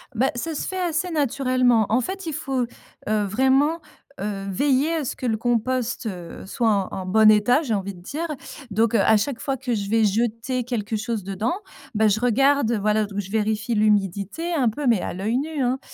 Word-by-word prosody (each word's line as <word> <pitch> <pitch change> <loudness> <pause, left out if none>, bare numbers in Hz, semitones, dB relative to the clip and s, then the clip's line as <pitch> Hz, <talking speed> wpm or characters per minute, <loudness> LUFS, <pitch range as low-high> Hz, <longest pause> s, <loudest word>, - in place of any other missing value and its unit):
Bah, 260 +4 +2
ça 320 +6 -3
se - - -2
fait 375 - -4
assez 355 0 0
naturellement. 255 -5 +2
En 235 +4 +3
fait, 380 +9 -5
il 320 - -3
faut, 270 -4 -1 0.4
heu, 215 0 +1
vraiment, 265 - +2 0.4
heu, 195 -1 -3
veiller 275 - +2
à 310 -3 -2
ce - - -3
que - - -6
le 225 -3 +1
compost, 240 +2 -1
heu, 180 -6 -6
soit 225 +4 0 0.2
en - - -4
en - - -6
bon 215 +3 +6
état, 215 +7 +4
j'ai 260 -8 -2
envie 200 -1 -2
de 175 - -14
dire. 310 - -4 0.4
Donc 225 +3 +2
heu, 225 - +4
à 220 +2 +5
chaque 235 +4 -1
fois 275 - -1
que 250 -2 -3
je 200 -3 -2
vais 225 +1 +3
jeter 230 +4 0
quelque 225 -3 -2
chose 220 -1 -3
dedans, 195 - -2 0.4
bah, 215 0 +4
je 210 +1 +1
regarde, 260 +1 +3
heu, 230 - +1
voilà, 215 +1 +2
ou 205 - -1
je 195 0 -11
vérifie 220 +1 0
l'humidité, 210 - 0
hein, 300 -5 +1
un 235 - +4
peu, 285 +6 -5
mais 230 -5 +4
à - - -4
l'œil 210 +6 -1
nu, 300 +1 -2
hein. 255 +1 +1
230 Hz, 220 wpm, -23 LUFS, 210-270 Hz, 0.4 s, bon